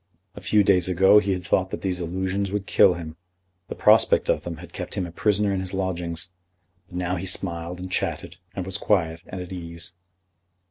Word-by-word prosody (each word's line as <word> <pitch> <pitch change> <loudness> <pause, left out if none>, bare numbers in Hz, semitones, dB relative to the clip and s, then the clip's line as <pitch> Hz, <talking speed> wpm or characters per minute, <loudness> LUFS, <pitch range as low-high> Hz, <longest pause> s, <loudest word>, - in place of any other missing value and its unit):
A - - -10
few 105 -1 +3
days 95 -2 +4
ago 95 +3 +6
he 100 -1 -1
had 90 -1 -2
thought 95 +2 +1
that - - -5
these 90 -2 -1
allusions 95 +3 -2
would 100 -1 -2
kill 90 -2 +5
him. 80 -2 -8 0.5
The - - -6
prospect - - +4
of - - +2
them 85 -2 -5
had 85 +1 -12
kept 90 - -5
him 95 -3 -1
a 85 - -8
prisoner 105 +2 +2
in 95 - 0
his 95 0 -5
lodgings; 90 -2 -2 0.6
but - - -12
now 90 +1 -1
he 95 +3 -4
smiled 85 -2 -2
and 90 0 -7
chatted, 85 -2 -2 0.2
and 95 - -3
was 95 +1 -3
quiet 85 -6 +1
and 95 - -6
at 90 +1 -7
ease. 85 -1 -6
90 Hz, 205 wpm, -24 LUFS, 85-95 Hz, 0.6 s, ago